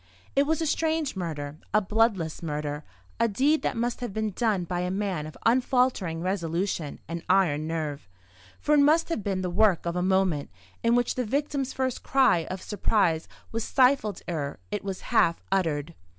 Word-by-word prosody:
It 280 Hz, +1 st, +3 dB
was 320 Hz, +1 st, +1 dB
a -, -, 0 dB
strange 315 Hz, -2 st, 0 dB
murder, 155 Hz, -5 st, -4 dB, 0.2 s
a -, -, +7 dB
bloodless 210 Hz, -6 st, +1 dB
murder; 150 Hz, -2 st, -3 dB, 0.4 s
a 230 Hz, -, +4 dB
deed 275 Hz, +9 st, +2 dB
that -, -, -1 dB
must 235 Hz, +1 st, -1 dB
have 245 Hz, -4 st, -4 dB
been 215 Hz, +1 st, -2 dB
done 210 Hz, -3 st, 0 dB
by 175 Hz, +1 st, -3 dB
a 180 Hz, 0 st, -1 dB
man 190 Hz, -5 st, -2 dB
of 155 Hz, -, -11 dB
unfaltering 245 Hz, -8 st, +2 dB
resolution 175 Hz, -3 st, -2 dB
and 170 Hz, +1 st, -4 dB
iron 155 Hz, -5 st, +3 dB
nerve: 155 Hz, -, -4 dB, 0.5 s
for 300 Hz, -, +1 dB
it 295 Hz, -, +6 dB
must 310 Hz, +4 st, +4 dB
have 330 Hz, -11 st, -2 dB
been 190 Hz, -2 st, -1 dB
the 180 Hz, -1 st, -2 dB
work 195 Hz, -2 st, +3 dB
of 170 Hz, 0 st, -2 dB
a 180 Hz, -, 0 dB
moment, 185 Hz, -5 st, +1 dB, 0.3 s
in 230 Hz, +1 st, +3 dB
which 245 Hz, 0 st, +2 dB
the 255 Hz, -, -1 dB
victim's 275 Hz, +2 st, -1 dB
first 260 Hz, -2 st, -2 dB
cry 260 Hz, -12 st, +3 dB
of 185 Hz, 0 st, -5 dB
surprise 190 Hz, -5 st, +1 dB, 0.2 s
was 225 Hz, 0 st, -2 dB
stifled 250 Hz, -7 st, +2 dB
ere 145 Hz, -5 st, -3 dB
it 205 Hz, -, -3 dB
was 195 Hz, -2 st, -4 dB
half 165 Hz, 0 st, +2 dB
uttered. 165 Hz, -5 st, 0 dB
195 Hz, 180 wpm, -27 LUFS, 165-245 Hz, 0.5 s, a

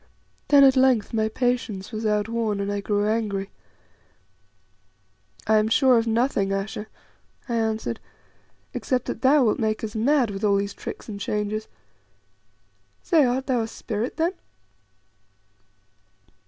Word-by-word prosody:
Then 285 Hz, -1 st, +7 dB
at 270 Hz, -1 st, +6 dB
length 260 Hz, -5 st, +3 dB
my 220 Hz, -1 st, +1 dB
patience 230 Hz, -5 st, -2 dB
was 220 Hz, 0 st, -3 dB
outworn, 210 Hz, 0 st, 0 dB
and 200 Hz, 0 st, -2 dB
I 205 Hz, 0 st, -2 dB
grew 205 Hz, 0 st, 0 dB
angry. 210 Hz, -3 st, -1 dB, 1.9 s
"I 220 Hz, -, +4 dB
am 215 Hz, -, +1 dB
sure 255 Hz, +3 st, +4 dB
of 230 Hz, -, -2 dB
nothing, 225 Hz, -4 st, +1 dB
Ayesha," 200 Hz, +2 st, -3 dB, 0.6 s
I 240 Hz, -, -3 dB
answered, 225 Hz, 0 st, -1 dB, 0.7 s
"except 255 Hz, -3 st, -1 dB
that -, -, -5 dB
thou 275 Hz, +1 st, +5 dB
wilt 220 Hz, -, +1 dB
make 215 Hz, -1 st, -1 dB
us 220 Hz, +1 st, -5 dB
mad 245 Hz, 0 st, +2 dB
with 195 Hz, +1 st, -6 dB
all 205 Hz, -1 st, +3 dB
these 200 Hz, 0 st, -1 dB
tricks -, -, -8 dB
and 205 Hz, -3 st, -6 dB
changes. 210 Hz, +1 st, -2 dB, 1.4 s
Say, 325 Hz, -5 st, +4 dB
art 255 Hz, +2 st, 0 dB
thou 250 Hz, -3 st, +1 dB
a 225 Hz, -, -2 dB
spirit 225 Hz, +1 st, -4 dB
then?" 335 Hz, +3 st, +1 dB
220 Hz, 140 wpm, -24 LUFS, 210-250 Hz, 1.9 s, Then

